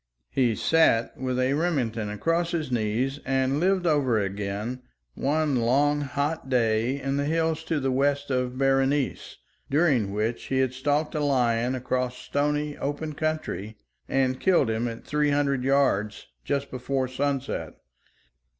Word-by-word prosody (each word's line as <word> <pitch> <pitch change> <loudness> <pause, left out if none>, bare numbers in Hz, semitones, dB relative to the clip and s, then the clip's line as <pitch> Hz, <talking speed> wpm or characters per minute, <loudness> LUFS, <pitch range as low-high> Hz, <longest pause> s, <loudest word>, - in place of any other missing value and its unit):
He 120 -4 +2
sat 160 -8 +3
with 130 -1 -2
a 130 +1 +2
Remington 130 -10 -1
across 165 - 0
his 155 -6 -2
knee 115 +2 +1 0.2
and 135 +1 +1
lived 185 +1 +2
over 145 -8 +2
again 100 +5 -3 0.3
one 145 - 0
long 140 +5 +2
hot 140 +1 -2
day 120 +1 +1
in 135 +1 -2
the 140 - 0
hills 160 0 0
to 160 - 0
the 135 -1 0
west 140 +2 +1
of 125 -1 -1
Berenice, 135 +1 +1 0.3
during 135 - +2
which 110 +3 -2
he 135 - -1
had 130 -1 +1
stalked 145 +3 0
a 150 -2 -1
lion 125 -3 +1
across 125 0 -2
stony, 145 +3 -1
open 145 +2 -3
country, 140 - -3 0.3
and 130 -1 +1
killed 175 -11 +3
him 110 +2 -1
at 115 -1 -7
three 150 0 +1
hundred 140 -2 +1
yards 130 -7 +1 0.2
just 140 -1 -2
before 130 +1 -1
sunset. 135 +1 -2
135 Hz, 145 wpm, -26 LUFS, 125-145 Hz, 0.3 s, sat